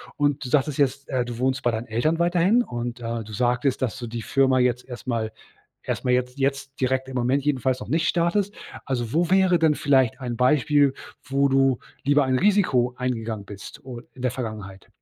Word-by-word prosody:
Und, 145 -1 0
du - - -5
sagtest 145 +1 +1
jetzt, 140 0 0
äh, 130 -3 0
du 120 -1 -7
wohnst 130 +1 0
bei 120 - +2
deinen 115 +1 -4
Eltern 155 +9 0
weiterhin 175 +7 +3
und, 120 - -5
äh, 115 0 -3
du 105 - -10
sagtest, 125 +3 0
dass 130 0 -2
du 120 - -5
die 115 +1 -5
Firma 130 +2 +2
jetzt 125 0 +1
erst 125 -1 -9
mal 115 -3 -1 0.5
erst - - -3
mal 125 - +2
jetzt 125 +1 0
jetzt 135 0 -2
direkt 130 0 0
im 130 - -8
Moment 130 +3 +1
jedenfalls 130 -3 0
noch - - -8
nicht 160 +4 +1
startest. 180 +4 +1 0.3
Also, 120 -4 -3
wo 170 +2 +1
wäre 190 -2 +4
denn 160 -2 +4
vielleicht 135 -4 +2
ein 120 -2 -4
Beispiel, 140 +2 +3 0.3
wo 140 0 +1
du 135 -2 +3 0.2
lieber 145 +1 +3
ein 130 -1 +1
Risiko 140 -12 +2
eingegangen 115 -4 -3
bist 100 +3 -10
o 125 -3 -7
in 130 - -11
der 125 -2 0
Vergangenheit? 110 -6 -7
130 Hz, 205 wpm, -24 LUFS, 120-145 Hz, 0.5 s, wäre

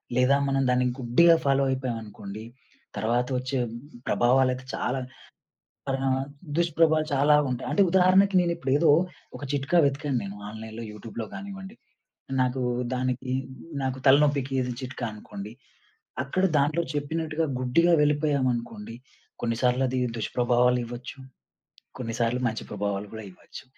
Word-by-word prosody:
లేదా, 125 +2 +4
మనం 135 0 +1
దాన్ని 125 0 +2
గుడ్డిగా 165 +8 +5
ఫాలో 135 0 +3
అయిపోయామనుకోండి. 110 -5 -4 0.5
తర్వాత 120 +2 +1
వచ్చే 130 +1 -3 0.5
ప్రభావాలయితే 130 +1 +2
చాలా 130 +2 -1 0.9
పరిణామాలు 135 0 0 0.3
దుష్ప్రభావాలు 160 -2 +3
చాలా 145 +2 +5
ఉంటయి. 125 - -3
అంటే 205 - +3
ఉదాహరణకి 190 +2 +4
నేనిప్పుడు 170 -5 -1
ఏదో 165 0 +3 0.5
ఒక - - -8
చిట్కా 145 +5 +1
వెతికాను 140 -1 0
నేను 100 +1 -6
ఆన్‌లైన్‌లో, 110 +1 -8
యూట్యూబ్‌లో 110 +1 -7
గానివ్వండి. 195 +1 -8 0.7
నాకు 130 +1 -1 0.3
దానికి 125 0 -2 0.5
నాకు 130 0 -2
తలనొప్పికి 140 -1 +4
ఇది 125 0 -3
చిట్కా 130 -1 -5
అనుకోండి. 105 0 -9 0.7
అక్కడ 185 +8 -1
దాంట్లో 155 +4 +2
చెప్పినట్టుగా 155 +2 -2
గుడ్డిగా 170 +8 +3
వెళ్ళిపోయామనుకోండి, 130 -7 0 0.5
కొన్నిసార్లు 125 +2 +1
అది 130 0 -1 0.2
దుష్ప్రభావాలు 125 +2 +2
ఇవ్వొచ్చు. 120 +3 -8 0.8
కొన్నిసార్లు 120 0 -1
మంచి 110 0 -3
ప్రభావాలు 100 0 -3
గూడా 110 -1 -7
ఇవ్వచ్చు. - - -12
130 Hz, 115 wpm, -26 LUFS, 120-150 Hz, 0.9 s, గుడ్డిగా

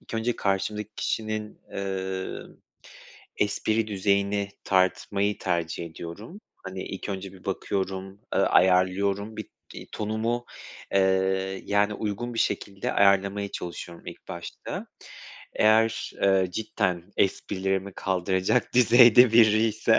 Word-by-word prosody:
ilk - - -10
önce 115 +2 -1
karşımdaki 105 +2 -1
kişinin, 110 -1 -3
eee, 95 -1 -3 1.0
espri 110 +2 0
düzeyini 100 0 0 0.2
tartmayı 100 +2 +1
tercih 85 -2 -2
ediyorum. 85 - -9 0.2
Hani, 95 0 -6
ilk 95 - -6
önce 95 -1 -5
bir 95 -2 -16
bakıyorum, 95 0 -3
ııı, - - +3
ayarlıyorum. 95 +3 +2
Bir, 110 - -5 0.3
iii, - - -9
tonumu, 110 +3 -2 0.5
eee, 95 0 +1
yani, 100 +1 +2
uygun 110 +3 -4
bir - - -4
şekilde 100 -3 -1
ayarlamaya 100 0 +3
çalışıyorum 85 -1 -7
ilk - - -10
başta. 85 0 -7 0.7
Eğer, 110 +1 +3
eee, 95 -1 +4
cidden 95 -4 -1
esprilerimi 95 0 -1
kaldıracak 95 +4 0
düzeyde 120 -1 +7
biriyse 110 0 +4
100 Hz, 110 wpm, -26 LUFS, 95-110 Hz, 1.0 s, düzeyde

